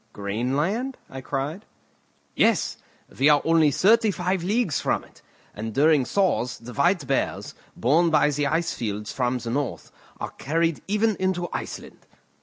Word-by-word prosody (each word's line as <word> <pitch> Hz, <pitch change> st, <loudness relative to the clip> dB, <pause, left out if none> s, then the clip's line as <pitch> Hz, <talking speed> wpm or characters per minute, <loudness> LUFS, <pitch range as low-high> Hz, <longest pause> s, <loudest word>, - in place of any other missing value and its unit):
"Greenland?" 140 Hz, -, -2 dB
I 130 Hz, -, -7 dB
cried. 145 Hz, +8 st, -4 dB, 0.7 s
"Yes; -, -, +2 dB, 0.4 s
we 140 Hz, +3 st, +5 dB
are 145 Hz, -1 st, +6 dB
only 160 Hz, -2 st, +4 dB
thirty 220 Hz, -, +4 dB
five 180 Hz, -1 st, -1 dB
leagues 195 Hz, -, 0 dB
from -, -, 0 dB
it; -, -, -20 dB, 0.3 s
and 110 Hz, +1 st, -6 dB
during 150 Hz, -2 st, +4 dB
thaws 180 Hz, -8 st, 0 dB
the 120 Hz, +1 st, -10 dB
white 170 Hz, +3 st, +2 dB
bears, -, -, -2 dB, 0.2 s
borne 160 Hz, +8 st, +3 dB
by 150 Hz, -1 st, +3 dB
the 145 Hz, 0 st, 0 dB
ice 165 Hz, +2 st, 0 dB
fields 105 Hz, -2 st, -4 dB
from 125 Hz, -1 st, 0 dB
the 120 Hz, -1 st, -5 dB
north, 140 Hz, 0 st, -3 dB, 0.3 s
are -, -, -4 dB
carried 165 Hz, +3 st, -1 dB
even 210 Hz, +2 st, +1 dB
into 185 Hz, -2 st, 0 dB
Iceland. -, -, -7 dB
150 Hz, 150 wpm, -24 LUFS, 130-185 Hz, 0.7 s, are